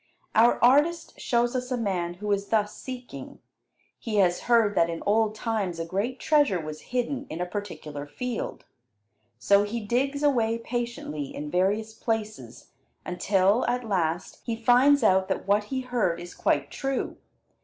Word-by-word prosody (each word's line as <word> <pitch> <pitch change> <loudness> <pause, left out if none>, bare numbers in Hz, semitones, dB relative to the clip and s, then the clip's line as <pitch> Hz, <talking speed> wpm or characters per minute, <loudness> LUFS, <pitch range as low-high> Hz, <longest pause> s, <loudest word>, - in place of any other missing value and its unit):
Our 230 +2 +5
artist 300 +7 +3
shows 240 0 +1
us 250 0 -3
a 250 - +1
man 180 -6 -2
who 205 +3 -4
is 200 0 0
thus 210 -2 0
seeking. 255 -1 -8 0.6
He 225 -2 -4
has 180 -3 +3
heard 230 -4 +4
that 170 -3 +3
in 165 -1 -5
old 215 +1 +2
times 215 -6 -2
a 165 - -3
great 205 +9 -2
treasure 290 - +3
was 155 -1 -7
hidden 255 +3 -2
in 160 - -5
a 180 - 0
particular 165 -7 -6
field. 250 - -5 0.7
So 200 +12 +4
he 205 +3 -2
digs 265 +7 -1
away 230 -6 +2
patiently 230 - -4
in 150 0 -5
various 205 +5 +1
places 220 -1 -4 0.3
until, 195 +4 +2
at 245 -1 -1
last, 175 -3 -1
he 230 - -2
finds 250 +4 +4
out 190 -2 +4
that 190 0 -3
what 205 +1 +3
he 260 +4 -3
heard 235 -9 0
is 175 0 -9
quite - - 0
true. 270 -1 -3
215 Hz, 160 wpm, -26 LUFS, 185-245 Hz, 0.7 s, Our